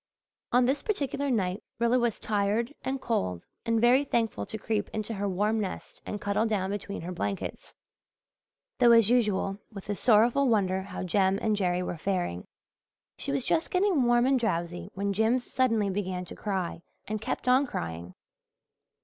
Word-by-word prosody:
On 250 Hz, 0 st, +4 dB
this 275 Hz, +3 st, +1 dB
particular 285 Hz, -, -1 dB
night 195 Hz, -5 st, 0 dB, 0.2 s
Rilla 235 Hz, +2 st, +3 dB
was 235 Hz, -3 st, 0 dB
tired 215 Hz, +4 st, 0 dB
and 265 Hz, +1 st, -2 dB
cold 95 Hz, -, -2 dB, 0.2 s
and 230 Hz, 0 st, +2 dB
very 245 Hz, +4 st, +5 dB
thankful 230 Hz, -5 st, -1 dB
to 220 Hz, -, -5 dB
creep 215 Hz, -1 st, -2 dB
into 215 Hz, +1 st, -3 dB
her 200 Hz, -1 st, -2 dB
warm 210 Hz, +4 st, +1 dB
nest 195 Hz, -3 st, -5 dB
and 210 Hz, -, -4 dB
cuddle 205 Hz, +2 st, 0 dB
down 195 Hz, -3 st, -1 dB
between 200 Hz, 0 st, -4 dB
her 175 Hz, +2 st, -5 dB
blankets, 190 Hz, +2 st, -4 dB, 1.0 s
though 240 Hz, -2 st, +7 dB
as 230 Hz, -1 st, +6 dB
usual 205 Hz, -4 st, +1 dB
with 200 Hz, -2 st, -10 dB
a -, -, -1 dB
sorrowful 240 Hz, +6 st, +4 dB
wonder 190 Hz, -4 st, +2 dB
how 190 Hz, -1 st, -6 dB
Jem 190 Hz, +1 st, +2 dB
and 220 Hz, -2 st, +1 dB
Jerry 180 Hz, -2 st, 0 dB
were 175 Hz, -, -4 dB
faring. 175 Hz, -, -2 dB, 0.7 s
She -, -, -3 dB
was 140 Hz, -1 st, -1 dB
just 325 Hz, -, +1 dB
getting 370 Hz, -5 st, +2 dB
warm 240 Hz, 0 st, +4 dB
and 265 Hz, 0 st, +3 dB
drowsy 175 Hz, -6 st, -2 dB
when 200 Hz, +1 st, -1 dB
Jims 225 Hz, +5 st, +2 dB
suddenly 225 Hz, -7 st, +1 dB
began 185 Hz, -2 st, -3 dB
to -, -, -9 dB
cry 190 Hz, -5 st, -3 dB, 0.3 s
and 215 Hz, 0 st, -3 dB
kept 220 Hz, -, -3 dB
on 260 Hz, +3 st, +4 dB
crying. 85 Hz, -, -5 dB
210 Hz, 170 wpm, -28 LUFS, 190-240 Hz, 1.0 s, though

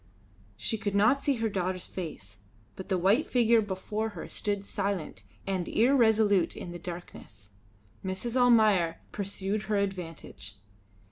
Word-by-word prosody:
She 225 Hz, -, -2 dB
could 205 Hz, -1 st, -2 dB
not 220 Hz, +7 st, +5 dB
see 275 Hz, 0 st, +1 dB
her 225 Hz, -1 st, 0 dB
daughter's 185 Hz, -3 st, -2 dB
face, 130 Hz, -, -7 dB, 0.4 s
but 190 Hz, -, -8 dB
the 190 Hz, -, +2 dB
white 200 Hz, -, +3 dB
figure 235 Hz, -2 st, +4 dB
before 210 Hz, +2 st, -3 dB
her -, -, -6 dB
stood 205 Hz, -1 st, -2 dB
silent 195 Hz, -, -3 dB, 0.2 s
and 190 Hz, -3 st, -1 dB
irresolute 220 Hz, -6 st, +3 dB
in 175 Hz, -, -6 dB
the 175 Hz, -, -7 dB
darkness. 160 Hz, -, -9 dB, 0.5 s
Mrs. 190 Hz, +6 st, -3 dB
Almayer 215 Hz, -9 st, +4 dB
pursued 200 Hz, +1 st, -3 dB
her 210 Hz, -1 st, 0 dB
advantage. 180 Hz, -, -4 dB
200 Hz, 135 wpm, -29 LUFS, 180-220 Hz, 0.5 s, not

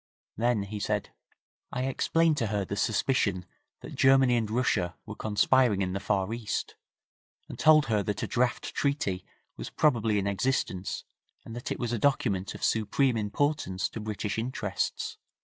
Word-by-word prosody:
Then 115 Hz, -2 st, +1 dB
he 105 Hz, +1 st, -6 dB
said, -, -, -2 dB, 0.6 s
'I 125 Hz, -, -2 dB
explained 160 Hz, +4 st, +2 dB
to 115 Hz, -, 0 dB
her 100 Hz, -1 st, -1 dB
the 100 Hz, -, -4 dB
suspicion 100 Hz, -3 st, +1 dB, 0.4 s
that -, -, -9 dB
Germany 135 Hz, -2 st, +5 dB
and 110 Hz, -3 st, 0 dB
Russia 105 Hz, -7 st, 0 dB
were -, -, -7 dB
conspiring 110 Hz, 0 st, +2 dB
in 90 Hz, 0 st, -2 dB
the 95 Hz, -, -2 dB
Far 100 Hz, +1 st, 0 dB
East, 115 Hz, -2 st, -3 dB, 0.7 s
and -, -, -9 dB
told 155 Hz, -1 st, +6 dB
her 105 Hz, -3 st, +1 dB
that 100 Hz, 0 st, -3 dB
a -, -, -1 dB
draft 125 Hz, 0 st, 0 dB
treaty 120 Hz, -11 st, -1 dB, 0.3 s
was -, -, -6 dB
probably 115 Hz, -8 st, +2 dB
in 100 Hz, -, 0 dB
existence, 100 Hz, -2 st, -1 dB, 0.4 s
and 115 Hz, -, -8 dB
that 120 Hz, -, -5 dB
it -, -, -1 dB
was 120 Hz, -1 st, -2 dB
a 115 Hz, -, -1 dB
document 100 Hz, -8 st, +1 dB
of -, -, -9 dB
supreme 115 Hz, +4 st, +2 dB
importance 110 Hz, -2 st, -1 dB
to -, -, -7 dB
British 105 Hz, 0 st, -3 dB
interests. 110 Hz, -6 st, -3 dB
110 Hz, 165 wpm, -28 LUFS, 100-130 Hz, 0.7 s, told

